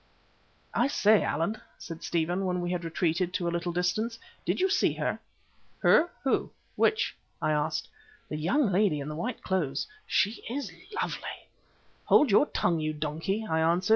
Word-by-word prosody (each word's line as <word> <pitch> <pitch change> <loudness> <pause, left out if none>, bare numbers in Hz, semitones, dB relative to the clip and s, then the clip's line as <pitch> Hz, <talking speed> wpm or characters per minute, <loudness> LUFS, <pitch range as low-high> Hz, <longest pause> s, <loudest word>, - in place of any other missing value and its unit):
"I - - +3
say, 215 -6 +4
Allan," 170 +8 -1 0.2
said 165 -1 -8
Stephen, 175 +3 0
when 180 0 0
we 175 0 -2
had 175 -1 -2
retreated 170 +2 0
to 175 -3 0
a - - +1
little 170 +1 -1
distance, 195 +7 0 0.3
"did - - +1
you 375 - +4
see 385 - +2
her?" - - -2 0.6
"Her? 340 - +6
Who? 270 - +1 0.3
Which?" 440 - +2 0.2
I 155 - +1
asked. 150 -1 0 0.4
"The - - -4
young 205 - +2
lady 185 -5 +3
in 140 +1 -4
the 150 - -5
white 235 +11 -4
clothes. 175 -8 0 0.2
She 210 +3 +1
is 280 +4 -3 0.3
lovely." - - -4 0.6
"Hold 290 -7 +5
your 285 +9 +5
tongue, 170 -2 +1
you 155 0 -1
donkey!" 160 +8 -2
I 160 -3 +1
answered. 170 +4 +2
180 Hz, 170 wpm, -29 LUFS, 160-215 Hz, 0.6 s, Her